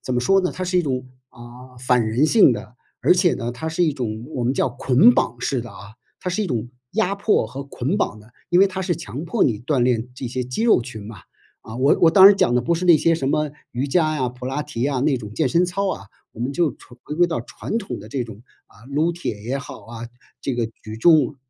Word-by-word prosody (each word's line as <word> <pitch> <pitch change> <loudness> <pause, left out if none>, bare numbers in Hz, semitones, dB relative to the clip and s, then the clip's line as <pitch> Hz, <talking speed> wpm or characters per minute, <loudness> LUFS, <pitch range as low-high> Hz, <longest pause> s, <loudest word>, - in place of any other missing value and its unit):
怎 130 - -3
么 125 - +1
说 195 +10 +3
呢？ 180 - -1
它 185 - -4
是 180 0 +1
一 - - +2
种， 130 -4 -2 0.2
啊， 125 +2 -14
反 125 -2 +2
人 120 +7 +2
性 200 - +6
的， 110 0 -7 0.3
而 - - +5
且 180 -1 +3
呢， 120 -1 -4
它 160 +7 -5
是 165 +2 +1
一 155 - +1
种 115 -5 -4
我 125 - -2
们 125 - +2
叫 135 - +1
捆 135 - +4
绑 120 - 0
式 130 0 -1
的 120 0 -9
啊， 100 +1 -12 0.3
它 180 - -3
是 215 +4 -1
一 - - -2
种 120 -6 -3 0.2
压 200 -2 +1
迫 200 - +1
和 135 +5 -7
捆 140 +5 -2
绑 110 - -1
的， 110 +3 -19 0.2
因 175 - +3
为 195 - +7
它 190 -1 -4
是 175 -3 -1
强 140 - -7
迫 220 +6 +1
你 110 -5 +1
锻 135 +1 0
炼 120 -1 +1
这 130 - -6
些 125 +1 -3
肌 125 - -4
肉 230 - +5
群 110 -4 -8
嘛。 110 -3 -9 0.4
啊， 110 - -9
我 135 +3 +3
我 165 - +6
当 190 +3 +9
然 200 0 +7
讲 120 - +2
的 - - +3
不 170 +8 0
是 170 +2 -3
那 170 -2 +8
些 165 +2 +2
什 135 -5 -2
么 150 0 0 0.2
瑜 125 +3 -2
伽 155 +1 +1
呀、 130 -3 0
普 125 +1 -8
拉 140 +3 -3
提 140 -5 -3
啊 140 -2 0
那 140 +1 +2
种 105 -4 -8
健 140 +5 0
身 170 +6 +3
操 190 +2 -1
啊， 100 +2 -9 0.3
我 115 - -12
们 125 +3 -2
就 165 0 +1
传 120 -1 -18
回 - - -5
归 175 +3 +4
到 175 -2 -1
传 225 - -5
统 195 - -6
的 105 - -11
这 125 +1 -2
种， 110 -1 -11 0.2
啊， 110 - -21
撸 155 +5 +1
铁 165 -11 -5
也 130 +4 -2
好 125 -6 -10
啊， 115 0 -8 0.3
这 130 -3 -3
个 115 - 0 0.2
举 110 0 -8
重 155 +3 +4
135 Hz, 280 characters per minute, -22 LUFS, 120-170 Hz, 0.4 s, 当